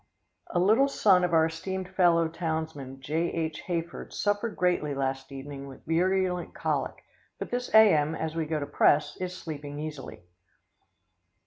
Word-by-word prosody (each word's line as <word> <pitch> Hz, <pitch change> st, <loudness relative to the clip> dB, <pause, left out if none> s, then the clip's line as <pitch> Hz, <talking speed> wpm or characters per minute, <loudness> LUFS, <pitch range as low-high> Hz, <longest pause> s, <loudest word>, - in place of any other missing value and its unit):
"A -, -, -2 dB
little 215 Hz, +10 st, +4 dB
son 195 Hz, -9 st, +4 dB
of 180 Hz, -, +1 dB
our 160 Hz, -1 st, +5 dB
esteemed 185 Hz, +3 st, -4 dB
fellow 175 Hz, -3 st, +3 dB
townsman, 160 Hz, -5 st, -4 dB
J.H. 160 Hz, +2 st, -2 dB
Hayford, 170 Hz, -1 st, -4 dB
suffered 205 Hz, +2 st, -1 dB
greatly 175 Hz, -5 st, 0 dB
last 135 Hz, 0 st, -3 dB
evening 140 Hz, 0 st, -7 dB
with 135 Hz, -1 st, -13 dB
virulent 180 Hz, +1 st, 0 dB
colic, -, -, -2 dB, 0.3 s
but -, -, -6 dB
this 245 Hz, 0 st, -2 dB
A.M., 160 Hz, -8 st, +6 dB
as 160 Hz, 0 st, -4 dB
we 160 Hz, -2 st, -1 dB
go 155 Hz, -1 st, -1 dB
to 145 Hz, -, -3 dB
press, 145 Hz, +1 st, +3 dB
is 180 Hz, 0 st, -4 dB
sleeping 145 Hz, -2 st, -7 dB
easily." 150 Hz, -, -7 dB
165 Hz, 145 wpm, -28 LUFS, 145-180 Hz, 0.3 s, A.M